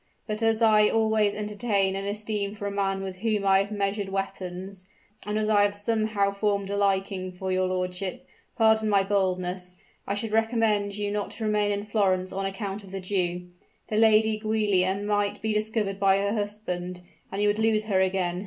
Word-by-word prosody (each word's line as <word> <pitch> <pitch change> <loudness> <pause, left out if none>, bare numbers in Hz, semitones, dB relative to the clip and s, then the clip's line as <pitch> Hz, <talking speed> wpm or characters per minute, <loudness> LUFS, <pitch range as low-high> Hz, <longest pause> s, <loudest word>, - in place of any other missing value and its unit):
But 215 0 -4
as 225 0 +2
I 215 -1 +5
always 220 -2 +2
entertain 205 -2 0
an 195 0 -3
esteem 210 0 -3
for 205 -1 -6
a 200 - -2
man 195 -1 -1
with 190 -1 -6
whom 210 0 -1
I 195 0 +5
have 200 +2 -2
measured 200 -1 -1
weapons 190 -1 -5 0.4
and 210 0 -1
as 215 0 0
I 210 -1 +4
have 205 0 +2
somehow 215 -1 0
formed 200 -1 -1
a - - -1
liking 195 -2 0
for 185 +1 -4
your 185 0 +1
lordship 180 0 -3 0.3
pardon 220 -1 +4
my 200 -2 +4
boldness 185 -2 -1 0.3
I 200 - -1
should 220 +1 -4
recommend 220 -2 +1
you 205 -1 -2
not 205 0 -2
to 225 - -7
remain 210 -1 +1
in 205 0 -2
Florence 190 -3 +1
on 195 0 -2
account 195 +1 -5
of 195 - -12
the 195 - -4
Jew. 180 -2 -2 0.4
The 215 - -2
Lady 220 0 +4
Giulia 210 -4 +1
might 205 0 -1
be 220 +1 -1
discovered 215 -2 -1
by 195 -1 +4
her 200 +1 0
husband, 180 -4 -3 0.3
and 195 - -4
you 210 - +3
would 205 +1 +1
lose 220 -1 +2
her 195 -3 +2
again. 185 -2 0
200 Hz, 190 wpm, -26 LUFS, 195-215 Hz, 0.4 s, I